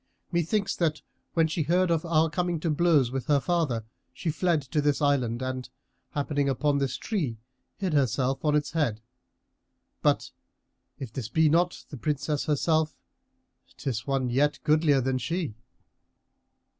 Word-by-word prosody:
Methinks 185 +4 0
that, 155 -3 0 0.3
when 165 -1 +4
she 160 +1 -2
heard 175 +4 +2
of 165 -2 +1
our 165 -1 +3
coming 175 +1 -1
to 165 - 0
blows 150 -6 +3
with 135 -1 -3
her 145 -2 +4
father, 140 -8 0 0.3
she 165 - -3
fled 165 -1 +1
to 150 +3 -1
this 145 -1 +2
island 130 -5 +1
and, 130 -1 -4 0.5
happening 145 -1 0
upon 145 +1 +1
this 135 -2 -1
tree, 155 - -2 0.4
hid 190 -5 -2
herself 135 -1 +1
on 150 -1 +3
its 150 -1 0
head; 145 -9 0 1.0
but, - - +1 0.7
if 125 -5 -7
this 115 -5 -4
be 160 +2 +4
not 175 +3 +1
the 145 - -7
Princess 145 +1 -1
herself, 155 +1 +1 0.8
'tis 120 -4 -3
one 135 -3 0
yet 145 +4 +2
goodlier 150 -3 +4
than 130 0 0
she." 165 -1 -2
150 Hz, 150 wpm, -27 LUFS, 135-165 Hz, 1.0 s, when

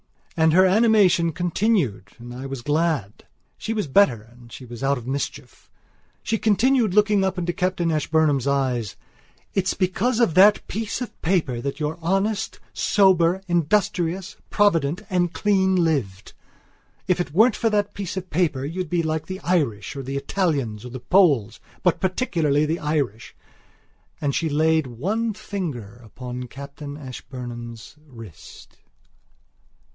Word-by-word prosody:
And 160 -1 +3
her 185 +2 +6
animation 195 -4 +4
continued 170 - 0
and 120 0 -10
I 130 +2 -6
was 135 -3 -6
glad. 150 - -1 0.3
She - - -4
was 210 -4 -1
better 135 - +3
and 120 +1 -18
she 130 - -10
was 120 0 -10
out 140 +1 +1
of 120 - -9
mischief. 135 +2 -5 0.5
She 225 +1 -1
continued, 220 0 +2
looking 210 -1 +4
up 190 -1 -1
into 175 -1 -1
Captain 180 -2 0
Ashburnham's 150 -3 +1
eyes: 125 -7 0 0.6
"It's 190 -1 0
because 205 +6 0
of 230 -9 +3
that 205 +4 +6
piece 220 +2 -3
of 220 -3 -7
paper 160 -9 0
that 140 +3 -4
you're 155 +2 -3
honest, 195 +5 -1
sober, 190 -3 +3
industrious, 175 +1 0
provident, 175 -3 +2
and 175 -1 +1
clean 190 -2 +2
lived. 140 - -1 0.7
If 180 -1 +2
it 175 - -5
weren't 220 +6 +5
for 230 - +1
that 205 -1 0
piece 195 -2 -5
of 185 -1 -6
paper 150 -6 0
you'd 175 +3 -4
be 170 0 0
like 160 0 -2
the 190 +1 -6
Irish 140 - -1
or 140 - -4
the 135 +1 -4
Italians 140 - -1
or 125 - -7
the 130 +1 -7
Poles, 140 - +3 0.2
but - - +2
particularly 165 - +1
the 160 +3 -1
Irish...." 140 -8 -2 0.8
And 140 -2 -1
she 165 +3 0
laid 160 0 +2
one 205 - -2
finger 145 - -6
upon 125 +3 -7
Captain 140 +2 -9
Ashburnham's 120 -3 -8
wrist. 115 - -13
160 Hz, 145 wpm, -23 LUFS, 135-190 Hz, 0.8 s, her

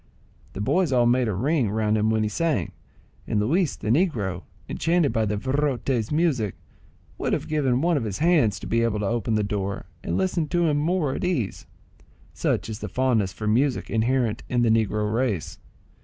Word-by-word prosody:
The - - -5
boys 175 - +1
all 125 -2 +3
made 120 +1 +3
a 110 - -1
ring 135 - +1
round 110 0 +1
him 110 0 +2
when 110 -1 +1
he - - +1
sang, 150 - -1 0.6
and 105 - 0
Luis 155 - +1
the 110 - -2
negro, 115 - 0 0.3
enchanted 165 -6 +1
by 110 -2 +1
the 105 0 -1
virote's 130 -2 -1
music, 150 - +1 0.6
would - - -1
have - - -2
given 135 -5 +1
one 170 -1 +2
of 135 - -1
his 105 -4 -3
hands 155 - +3
to - - -7
be 115 - +1
able 115 -2 0
to - - -1
open 115 0 0
the 105 - +1
door, 100 -1 -3 0.2
and 85 - -1
listen 95 - 0
to 175 +2 +1
him 150 -2 +2
more 155 -2 0
at - - -4
his 180 - +1
ease, 120 - -3 0.7
such 100 - -1
is 110 -1 -6
the - - -5
fondness 120 -7 +1
for 105 +3 -7
music 125 +5 +1
inherent 115 0 +1
in 120 -1 +1
the 115 - +3
negro 105 -1 +1
race. 115 -8 -1
120 Hz, 200 wpm, -24 LUFS, 105-145 Hz, 0.7 s, all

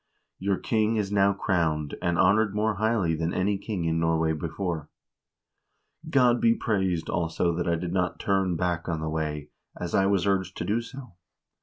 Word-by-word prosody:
Your 95 0 0
king 110 +2 +1
is 105 -2 -1
now 100 -1 +4
crowned, 80 -7 0
and 85 -1 0
honored 105 +2 +3
more 105 -1 0
highly 105 -5 +1
than 80 +1 -1
any 100 +2 0
king 100 -5 -3
in 80 0 +1
Norway 80 -1 +1
before. 80 0 -4 1.2
God 125 -5 +4
be 115 0 +4
praised, 95 -6 -1
also, 85 0 0
that 85 +1 -2
I 85 - +2
did 85 +1 -4
not 90 -1 0
turn 95 -3 +1
back 85 0 -1
on 80 -2 -1
the 80 0 -3
way, 75 -2 -3 0.3
as 85 - -4
I 95 - +3
was 100 -2 +2
urged 95 -2 0
to - - -3
do. 110 +3 0
90 Hz, 175 wpm, -26 LUFS, 80-100 Hz, 1.2 s, now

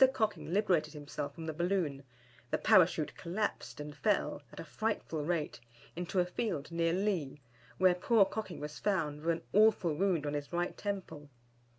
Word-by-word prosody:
Cocking 215 -8 -1
liberated 185 -5 +2
himself 145 -1 -5
from 165 - -7
the 160 - -3
balloon, 170 -4 0 0.5
the - - +1
Parachute - - +4
collapsed 170 - -3
and 150 0 -6
fell, 200 -3 +1
at - - -11
a - - -4
frightful 165 -3 -2
rate, 155 -4 -1 0.4
into 180 +2 -1
a 180 - +4
field 180 -5 -3
near 165 0 +1
Lea, 180 -7 -1 0.4
where 185 -1 +5
poor 200 +3 +4
Cocking 205 -5 -5
was 150 0 -6
found 155 -8 0
with 165 - -1
an - - -10
awful 210 -6 +5
wound 175 -2 +1
on 145 - -2
his 145 -1 -4
right 175 0 -1
temple. 190 -8 -5
170 Hz, 170 wpm, -33 LUFS, 150-200 Hz, 0.5 s, where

